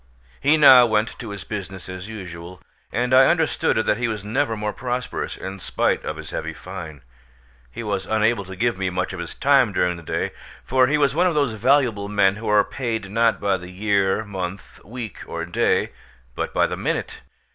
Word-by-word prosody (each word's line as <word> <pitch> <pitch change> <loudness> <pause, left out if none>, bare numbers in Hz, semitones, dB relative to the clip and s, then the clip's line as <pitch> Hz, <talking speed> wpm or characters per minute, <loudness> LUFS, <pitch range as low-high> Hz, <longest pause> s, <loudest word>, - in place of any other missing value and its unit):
He 150 +3 +4
now 130 -5 +8
went 110 +1 0
to 115 - -6
his 100 -4 -7
business 95 0 -7
as 95 +1 -7
usual; 90 -4 -8 0.3
and 125 +3 0
I 130 0 +7
understood 160 -8 +1
that 110 0 +1
he 120 - 0
was 105 -3 -4
never 115 +1 0
more 105 0 -2
prosperous, 125 0 -4
in 95 0 -7
spite - - 0
of - - -4
his - - -8
heavy - - -4
fine. 80 -4 -9 0.7
He 70 - -7
was 100 -3 -2
unable 110 0 +1
to 95 +1 -8
give 115 0 0
me 95 -1 0
much 90 +1 -2
of 90 - -6
his 85 - -6
time 135 -5 +4
during 90 -2 0
the - - -10
day; 80 - -2 0.3
for 130 0 +3
he 150 +3 +2
was 140 -2 +2
one 175 +4 +3
of 170 - 0
those 140 -6 +1
valuable 115 -3 +2
men 100 -1 +3
who 110 - -6
are 105 -1 +5
paid, 115 -7 -4
not 115 +1 +2
by 100 -2 +1
the 90 0 -10
year, 100 +2 +1
month, 95 -1 -6
week, 115 0 -7
or 85 0 -4
day, 85 - +1 0.4
but - - -3
by - - +2
the - - -3
minute. - - -3
105 Hz, 200 wpm, -22 LUFS, 95-125 Hz, 0.7 s, now